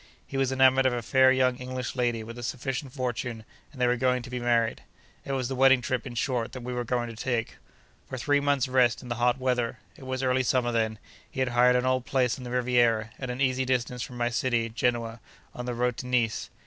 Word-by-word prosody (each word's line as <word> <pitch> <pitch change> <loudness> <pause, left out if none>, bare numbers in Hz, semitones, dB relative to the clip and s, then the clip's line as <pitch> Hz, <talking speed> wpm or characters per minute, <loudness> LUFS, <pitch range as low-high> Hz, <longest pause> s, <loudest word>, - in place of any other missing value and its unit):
He - - -9
was 135 -1 +1
enamoured 130 0 +4
of 130 - +1
a 120 -1 -3
fair 130 +3 +5
young 130 -1 +2
English 125 -1 -5
lady, 120 -3 0
with 115 +1 -9
a - - -6
sufficient 130 +3 -4
fortune, 120 -3 -4 0.3
and 140 - -14
they 125 - +3
were 120 0 +3
going 125 0 +1
to 125 - -10
be 125 - -3
married. 120 -1 +1 0.4
It 135 - -4
was 130 -2 -1
the 135 - -3
wedding 135 0 +5
trip, 130 +3 -2
in 120 - -8
short, 120 -1 -1
that 130 - -7
we 125 +1 -4
were 125 0 -2
going 120 0 -1
to - - -10
take. 115 -1 -2 0.5
For 130 - -4
three 145 +3 +2
months' 140 -2 +1
rest 125 -1 +2
in 125 - -9
the 120 - -2
hot 125 +1 +3
weather 125 -3 -1 0.2
(it 130 - -12
was 130 0 -2
early 130 0 +2
summer 125 -1 +1
then) 110 -1 0 0.3
he - - -7
had 130 - +1
hired 125 +1 +4
an 125 0 +1
old 130 -1 0
place 125 -3 +1
on - - -8
the 125 - -6
Riviera, 120 -3 +2
at 130 - -5
an 125 +2 -4
easy 130 -1 +2
distance 125 -1 -1
from 125 +1 -6
my 120 0 0
city, 120 -2 0
Genoa, 115 0 -1 0.3
on 125 0 -6
the 120 - -2
road 125 0 0
to 125 - -6
Nice. 120 -3 0
125 Hz, 245 wpm, -27 LUFS, 120-130 Hz, 0.5 s, fair